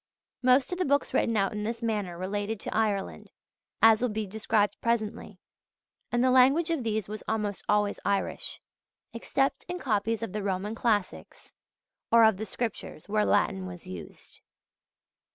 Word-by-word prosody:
Most 255 Hz, +3 st, +4 dB
of 360 Hz, -, -3 dB
the -, -, +2 dB
books 285 Hz, 0 st, +1 dB
written 230 Hz, -1 st, +2 dB
out 195 Hz, -1 st, +1 dB
in 210 Hz, 0 st, -3 dB
this 230 Hz, +2 st, -4 dB
manner 205 Hz, -6 st, -2 dB
related 205 Hz, +3 st, -3 dB
to -, -, -5 dB
Ireland, 210 Hz, -3 st, -1 dB, 0.5 s
as 225 Hz, 0 st, +7 dB
will 250 Hz, -, +1 dB
be 215 Hz, 0 st, -2 dB
described 210 Hz, 0 st, 0 dB
presently; 230 Hz, -3 st, -2 dB, 0.7 s
and 240 Hz, 0 st, +2 dB
the 255 Hz, -, +4 dB
language 270 Hz, +7 st, +5 dB
of 315 Hz, -6 st, -1 dB
these 220 Hz, -3 st, -1 dB
was 215 Hz, +1 st, -6 dB
almost 210 Hz, -2 st, -2 dB
always 205 Hz, -1 st, +2 dB
Irish; 200 Hz, -1 st, -2 dB, 0.5 s
except 270 Hz, +4 st, -1 dB
in 355 Hz, +1 st, -4 dB
copies 225 Hz, -, -1 dB
of 200 Hz, -, -5 dB
the 210 Hz, -, -2 dB
Roman 195 Hz, +2 st, -2 dB
classics 220 Hz, -4 st, -2 dB, 0.6 s
or 230 Hz, 0 st, +7 dB
of 220 Hz, -3 st, +5 dB
the 220 Hz, +2 st, -5 dB
Scriptures, 225 Hz, -8 st, -5 dB
where 210 Hz, 0 st, +1 dB
Latin 190 Hz, -2 st, +1 dB
was 180 Hz, -1 st, -9 dB
used. 90 Hz, -2 st, -10 dB
215 Hz, 160 wpm, -28 LUFS, 205-235 Hz, 0.7 s, as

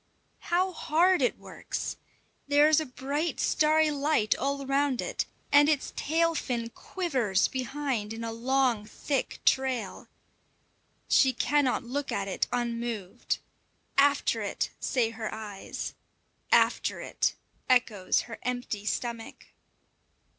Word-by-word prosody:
How 365 Hz, +2 st, +2 dB
hard 350 Hz, +2 st, +2 dB
it -, -, +1 dB
works! -, -, -5 dB, 0.5 s
there 290 Hz, +1 st, +5 dB
is 310 Hz, 0 st, +5 dB
a 315 Hz, -, -3 dB
bright 280 Hz, +6 st, -2 dB
starry 310 Hz, 0 st, +3 dB
light 285 Hz, -7 st, +2 dB
all 275 Hz, +1 st, -2 dB
round 275 Hz, -1 st, +1 dB
it, -, -, -2 dB, 0.2 s
and 290 Hz, +1 st, +7 dB
its 295 Hz, -3 st, 0 dB
tail 330 Hz, +2 st, +1 dB
fin 235 Hz, -6 st, -3 dB
quivers 255 Hz, -, 0 dB
behind 260 Hz, -4 st, -3 dB
in 225 Hz, +1 st, -5 dB
a 230 Hz, -, -3 dB
long 245 Hz, -1 st, +1 dB
thick 275 Hz, +4 st, -2 dB
trail. 265 Hz, -2 st, 0 dB, 1.0 s
She 265 Hz, -1 st, +5 dB
cannot 285 Hz, -3 st, +1 dB
look 275 Hz, +4 st, -3 dB
at 195 Hz, 0 st, -1 dB
it 190 Hz, -, -1 dB
unmoved. 235 Hz, -5 st, -2 dB, 0.6 s
"After 285 Hz, 0 st, +3 dB
it!" -, -, -2 dB
say 235 Hz, -3 st, +1 dB
her 225 Hz, -1 st, -5 dB
eyes; 210 Hz, -3 st, -6 dB, 0.6 s
"after -, -, +3 dB
it!" -, -, -1 dB, 0.3 s
echoes 230 Hz, -7 st, +3 dB
her 230 Hz, -2 st, -9 dB
empty 245 Hz, -4 st, -3 dB
stomach. 230 Hz, 0 st, -4 dB
260 Hz, 120 wpm, -28 LUFS, 230-290 Hz, 1.0 s, and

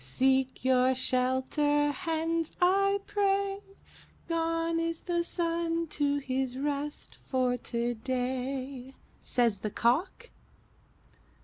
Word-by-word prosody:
'Seek 260 Hz, -, +1 dB
your 260 Hz, 0 st, +4 dB
shelter, 260 Hz, +4 st, +2 dB
hens, 325 Hz, +2 st, -1 dB
I 395 Hz, +2 st, +3 dB
pray. 395 Hz, -1 st, +1 dB, 0.7 s
Gone 330 Hz, 0 st, 0 dB
is 330 Hz, 0 st, -2 dB
the 345 Hz, -1 st, 0 dB
sun 335 Hz, -1 st, -1 dB
to 285 Hz, -1 st, 0 dB
his 260 Hz, -2 st, -2 dB
rest 290 Hz, +1 st, -3 dB
for 255 Hz, -2 st, +2 dB
today,' 255 Hz, +3 st, -3 dB, 0.3 s
Says 235 Hz, -5 st, +1 dB
the 215 Hz, -, -3 dB
Cock.'" 275 Hz, -, 0 dB
285 Hz, 95 wpm, -29 LUFS, 255-330 Hz, 0.7 s, your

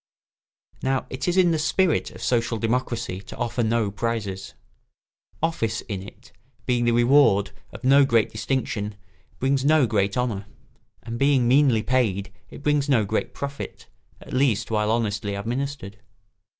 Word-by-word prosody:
] -, -, -76 dB, 0.3 s
Now 135 Hz, 0 st, 0 dB
it 130 Hz, +4 st, -4 dB
is 175 Hz, +1 st, +1 dB
in 180 Hz, -2 st, +5 dB
the 160 Hz, -, +1 dB
spirit 165 Hz, +2 st, +1 dB
of -, -, -11 dB
social 115 Hz, -1 st, +1 dB
democracy 115 Hz, -4 st, -2 dB
to -, -, -11 dB
offer 120 Hz, 0 st, -1 dB
no 110 Hz, -2 st, +1 dB
prizes. 100 Hz, -3 st, -3 dB, 0.9 s
Office 115 Hz, -10 st, 0 dB
in 100 Hz, -3 st, -5 dB
it, 100 Hz, -, -13 dB, 0.3 s
being 120 Hz, -1 st, +1 dB
the 120 Hz, -, +3 dB
reward 120 Hz, -4 st, +4 dB, 0.2 s
of -, -, -11 dB
no 140 Hz, +2 st, +6 dB
great 115 Hz, -5 st, +2 dB
distinction, 110 Hz, -3 st, -2 dB, 0.4 s
brings 135 Hz, 0 st, +1 dB
no 150 Hz, -1 st, +4 dB
great 100 Hz, -2 st, 0 dB
honour, 110 Hz, -5 st, -2 dB, 0.6 s
and 115 Hz, +1 st, -6 dB
being 140 Hz, -3 st, +3 dB
meanly 130 Hz, -4 st, +4 dB
paid 105 Hz, -6 st, 0 dB, 0.2 s
it -, -, -11 dB
brings 150 Hz, -1 st, +1 dB
no 115 Hz, -6 st, +3 dB
great 110 Hz, +2 st, -2 dB
profit, 140 Hz, 0 st, -6 dB, 0.3 s
at -, -, -11 dB
least 125 Hz, -4 st, +1 dB
while 105 Hz, -1 st, +1 dB
honestly 105 Hz, -3 st, -1 dB
administered. 115 Hz, -1 st, -4 dB
120 Hz, 150 wpm, -24 LUFS, 105-135 Hz, 0.9 s, no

